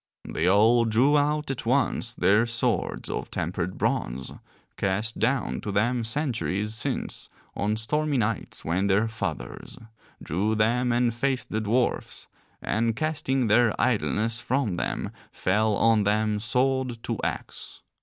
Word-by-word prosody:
They 80 - -1
all 110 +5 +5
drew 120 +7 +3
out 150 0 +1
at 135 - -5
once 120 -1 0
their 105 +4 +3
swords 115 -3 0
of - - -3
tempered 90 +2 -3
bronze, 65 +2 -2 0.4
cast 105 +4 -1
down 130 +4 0
to 105 - -4
them 120 +4 +1
centuries 110 -5 -1
since 110 - -3 0.3
on 105 +2 0
stormy 150 +6 0
nights 110 -2 -2
when 90 +5 +1
their 100 +3 +3
fathers, 110 - -5 0.4
drew 100 +7 -1
them 120 +3 +2
and 120 0 +2
faced 130 +2 -1
the 110 - -1
dwarfs, 120 +4 -1 0.4
and 115 +1 0
casting 145 -3 0
their 110 +1 +3
idleness 115 -1 +1
from 120 -7 0
them, - - -3 0.2
fell 105 +3 +1
on 115 0 +4
them, 105 +1 +1
sword 125 +1 0
to - - -3
axe. - - -5
115 Hz, 135 wpm, -26 LUFS, 105-125 Hz, 0.4 s, all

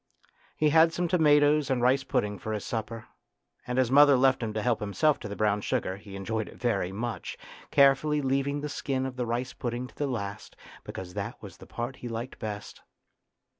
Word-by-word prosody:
He 155 - +3
had 160 +1 +6
some 175 +1 -1
tomatoes 150 -3 +4
and 130 -2 +1
rice 130 +3 +3
pudding 105 -6 -1
for 110 +4 -4
his 105 - -4
supper, 115 0 -4 0.6
and 125 0 -2
as 130 -2 +2
mother 145 0 +7
left 130 0 +3
him 110 -2 -2
to 110 - -2
help 120 -3 +1
himself 140 +9 +1
to 100 -1 -6
brown 105 -1 +1
sugar 95 -1 -1
he 100 -1 -11
enjoyed 110 +2 -3
it - - -14
very 100 -7 0
much, 115 +4 -4 0.3
carefully 140 +2 +4
leaving 140 +1 0
the 150 - -3
skin 135 -2 -2
of 130 -1 -5
the 125 -2 -2
rice 120 +2 -2
pudding 120 +1 -4
to - - -14
the 145 - -1
last, 105 -5 -5 0.3
because 90 -1 -7
that - - -5
was - - -11
the - - -14
part 120 +3 -5
he 125 - -7
liked 115 +2 -5
best. 105 -2 -6
125 Hz, 200 wpm, -28 LUFS, 110-140 Hz, 0.6 s, mother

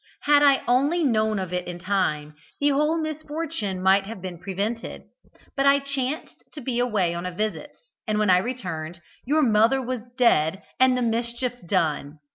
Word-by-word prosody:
Had 290 0 +5
I 280 -2 +5
only 280 +8 +2
known 220 -5 +2
of 185 -2 -4
it 180 0 -2
in 175 -1 -5
time, 175 -5 -1 0.3
the 285 - +3
whole 300 +3 +2
misfortune 305 - -4
might 195 +1 +4
have 220 -2 -7
been 180 -2 -7
prevented, 200 +6 -4 0.5
but 275 0 +2
I 280 0 +6
chanced 275 +1 -4
to 300 - -8
be 245 -1 -2
away 210 -8 +1
on 175 +1 -4
a - - -4
visit, 215 +10 -4 0.3
and 215 -1 0
when 210 -3 +3
I 180 - +6
returned, 175 -8 -5 0.3
your 300 +4 +2
mother 225 +2 +4
was 255 -2 -3 0.2
dead 190 -7 +3 0.2
and 255 -1 +5
the 250 - 0
mischief 235 +2 -1
done. 155 -5 -1
225 Hz, 175 wpm, -24 LUFS, 185-270 Hz, 0.5 s, I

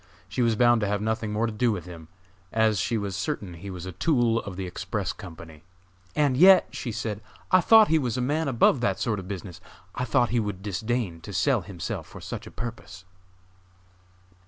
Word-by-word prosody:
She 105 +7 -2
was 115 -2 +3
bound 120 0 +4
to 105 - 0
have 100 +1 0
nothing 110 0 -2
more 110 +2 0
to 115 - -2
do 115 +2 +2
with 90 -6 -4
him, 85 -3 -10 0.4
as 110 -2 +2
she 115 +4 0
was 100 -2 -3
certain 95 -1 -3
he 90 +4 -9
was 90 -2 -7
a 95 - -5
tool 115 - +2
of 100 -3 -8
the 95 0 -4
Express 90 - -3
Company. 80 -2 -11 0.5
"And 145 -4 +2
yet," 185 +5 +7
she 120 - -5
said, 110 -2 -4 0.3
"I 185 0 +6
thought 220 +2 +7
he 160 0 +4
was 125 -4 -2
a - - 0
man 150 +5 0
above 130 0 +3
that 100 -5 0
sort 110 -4 -1
of 95 - -9
business! 95 -3 -7 0.3
I 125 - -2
thought 120 0 +2
he 120 - +1
would 100 -3 -4
disdain 105 -3 -2
to 100 - -9
sell 105 +7 +2
himself 90 -1 -6
for - - -11
such - - -7
a - - -10
purpose." 100 -5 -8
110 Hz, 205 wpm, -26 LUFS, 95-120 Hz, 0.5 s, yet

